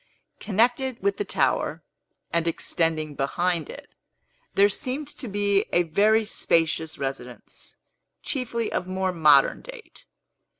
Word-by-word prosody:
Connected 245 Hz, +3 st, 0 dB
with 200 Hz, 0 st, +1 dB
the -, -, -1 dB
tower, 150 Hz, -1 st, 0 dB, 0.5 s
and 170 Hz, 0 st, +1 dB
extending 160 Hz, -2 st, -1 dB
behind 170 Hz, +4 st, -1 dB
it, -, -, -11 dB, 0.6 s
there 200 Hz, +1 st, +6 dB
seemed 260 Hz, +8 st, -4 dB
to 255 Hz, -, -9 dB
be 200 Hz, -1 st, +1 dB
a 175 Hz, -, +3 dB
very 215 Hz, +7 st, +3 dB
spacious 160 Hz, -5 st, 0 dB
residence, 135 Hz, -3 st, -7 dB, 0.5 s
chiefly 235 Hz, -4 st, -2 dB
of 180 Hz, -, -2 dB
more 185 Hz, 0 st, -1 dB
modern 150 Hz, -5 st, +4 dB
date. -, -, -12 dB
185 Hz, 120 wpm, -25 LUFS, 160-220 Hz, 0.6 s, there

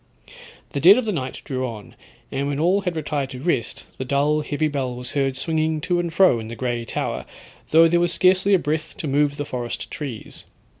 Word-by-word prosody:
The 140 Hz, -, -2 dB
dead 185 Hz, -, +8 dB
of 255 Hz, -, 0 dB
the 215 Hz, -, 0 dB
night 130 Hz, -8 st, -4 dB
drew 130 Hz, -2 st, -3 dB
on, 110 Hz, -4 st, -9 dB, 0.4 s
and 140 Hz, +1 st, -1 dB
when 145 Hz, 0 st, -2 dB
all 180 Hz, +5 st, +3 dB
had 180 Hz, -3 st, -2 dB
retired 145 Hz, -3 st, -2 dB
to 130 Hz, -2 st, -8 dB
rest, 135 Hz, -5 st, -1 dB
the -, -, -1 dB
dull 145 Hz, +3 st, +1 dB
heavy 150 Hz, +1 st, -1 dB
bell 135 Hz, -4 st, -2 dB
was 125 Hz, 0 st, -6 dB
heard 135 Hz, -2 st, 0 dB
swinging 160 Hz, +1 st, 0 dB
to 175 Hz, +2 st, 0 dB
and 170 Hz, -1 st, -2 dB
fro 170 Hz, -8 st, +4 dB
in 110 Hz, -, -7 dB
the 115 Hz, -, -7 dB
grey 120 Hz, -1 st, -2 dB
tower, -, -, -3 dB, 0.5 s
though 165 Hz, +1 st, +7 dB
there 170 Hz, +1 st, +3 dB
was 175 Hz, -1 st, +2 dB
scarcely 185 Hz, +2 st, +4 dB
a -, -, +5 dB
breath 155 Hz, -1 st, -3 dB
to 175 Hz, -7 st, -4 dB
move 145 Hz, +1 st, +1 dB
the 145 Hz, -, -3 dB
forest 125 Hz, -4 st, -4 dB
trees. 130 Hz, -8 st, -6 dB
145 Hz, 215 wpm, -23 LUFS, 130-170 Hz, 0.5 s, dead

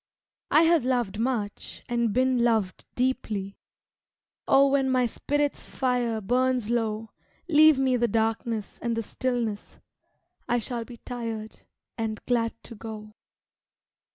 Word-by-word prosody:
I 310 Hz, -, +6 dB
have 330 Hz, -3 st, +4 dB
loved 240 Hz, -5 st, 0 dB
much 225 Hz, -4 st, -3 dB
and 235 Hz, -2 st, +1 dB
been 255 Hz, +1 st, +2 dB
loved 220 Hz, -6 st, +1 dB
deeply 220 Hz, -6 st, -2 dB, 0.9 s
Oh 275 Hz, 0 st, +5 dB
when 270 Hz, -1 st, +2 dB
my 255 Hz, -1 st, +3 dB
spirit's 290 Hz, +5 st, -1 dB
fire 245 Hz, -4 st, 0 dB
burns 250 Hz, +1 st, +1 dB
low, 225 Hz, -2 st, -1 dB, 0.4 s
Leave 310 Hz, -2 st, +6 dB
me 260 Hz, -2 st, +2 dB
the 240 Hz, 0 st, +2 dB
darkness 225 Hz, 0 st, -1 dB
and 235 Hz, -1 st, -1 dB
the 230 Hz, -, -1 dB
stillness, 235 Hz, -3 st, -3 dB, 0.7 s
I 240 Hz, -, +3 dB
shall 235 Hz, 0 st, -3 dB
be 240 Hz, -1 st, -11 dB
tired 225 Hz, -3 st, -6 dB, 0.4 s
and 220 Hz, -2 st, -2 dB
glad 230 Hz, -2 st, +1 dB
to -, -, -7 dB
go. 215 Hz, -1 st, -8 dB
235 Hz, 125 wpm, -26 LUFS, 220-255 Hz, 0.9 s, I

